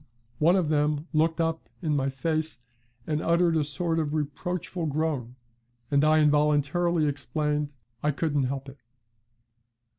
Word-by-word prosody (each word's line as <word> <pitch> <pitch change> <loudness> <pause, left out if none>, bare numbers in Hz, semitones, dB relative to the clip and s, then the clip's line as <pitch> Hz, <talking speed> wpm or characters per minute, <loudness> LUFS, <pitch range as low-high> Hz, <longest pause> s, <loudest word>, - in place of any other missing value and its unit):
One 170 +4 +5
of 180 -5 +1
them 150 +1 +1
looked 160 +2 +2
up 165 0 -1
in 155 -2 +1
my 135 -1 +1
face 155 +2 -1 0.5
and 155 0 -1
uttered 170 0 +3
a 155 - +2
sort 165 +3 -1
of 155 -1 -1
reproachful 165 +3 -3
groan, 145 -5 -2 0.6
and 140 0 +4
I 155 +1 +5
involuntarily 150 +3 +2
exclaimed, 150 0 -1 0.3
'I 150 - +1
couldn't 145 -2 0
help 135 +1 -4
it.' 135 0 -11
150 Hz, 140 wpm, -27 LUFS, 145-165 Hz, 0.6 s, One